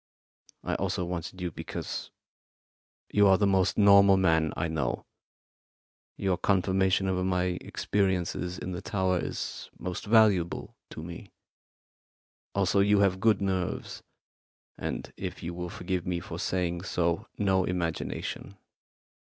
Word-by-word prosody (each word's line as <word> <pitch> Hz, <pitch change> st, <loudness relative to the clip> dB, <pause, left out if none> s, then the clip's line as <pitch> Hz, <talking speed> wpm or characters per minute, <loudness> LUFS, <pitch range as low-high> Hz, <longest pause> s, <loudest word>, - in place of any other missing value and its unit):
I -, -, -2 dB
also 90 Hz, -, -1 dB
wanted 90 Hz, +1 st, -5 dB
you 90 Hz, -1 st, -2 dB
because -, -, -5 dB, 1.0 s
you 105 Hz, -1 st, +5 dB
are 95 Hz, -1 st, +6 dB
the 105 Hz, -, +2 dB
most 95 Hz, -2 st, +2 dB
normal 100 Hz, -1 st, +7 dB
man 80 Hz, -4 st, +3 dB
I 85 Hz, -, 0 dB
know. 80 Hz, -6 st, -2 dB, 1.1 s
Your 95 Hz, -2 st, 0 dB
confirmation 95 Hz, 0 st, +2 dB
of 90 Hz, -1 st, 0 dB
my 90 Hz, -1 st, 0 dB
experiences 90 Hz, -2 st, -1 dB
in 90 Hz, -, -5 dB
the 90 Hz, +1 st, -4 dB
tower 95 Hz, -3 st, 0 dB
is -, -, -5 dB
most 90 Hz, +3 st, -5 dB
valuable 105 Hz, -6 st, +3 dB
to 80 Hz, -, -8 dB
me. 85 Hz, 0 st, -8 dB, 1.3 s
Also, 100 Hz, 0 st, +2 dB
you 100 Hz, +1 st, +4 dB
have 95 Hz, -2 st, +2 dB
good 105 Hz, -1 st, +3 dB
nerves, 95 Hz, -2 st, -2 dB, 0.7 s
and, -, -, -5 dB
if -, -, -6 dB
you 85 Hz, +1 st, -4 dB
will 90 Hz, 0 st, -5 dB
forgive 95 Hz, -3 st, -3 dB
me 90 Hz, -1 st, 0 dB
for -, -, -7 dB
saying 85 Hz, -2 st, -1 dB
so, 85 Hz, -2 st, -1 dB
no 95 Hz, -2 st, +2 dB
imagination. 90 Hz, +2 st, -3 dB
95 Hz, 130 wpm, -28 LUFS, 90-100 Hz, 1.3 s, normal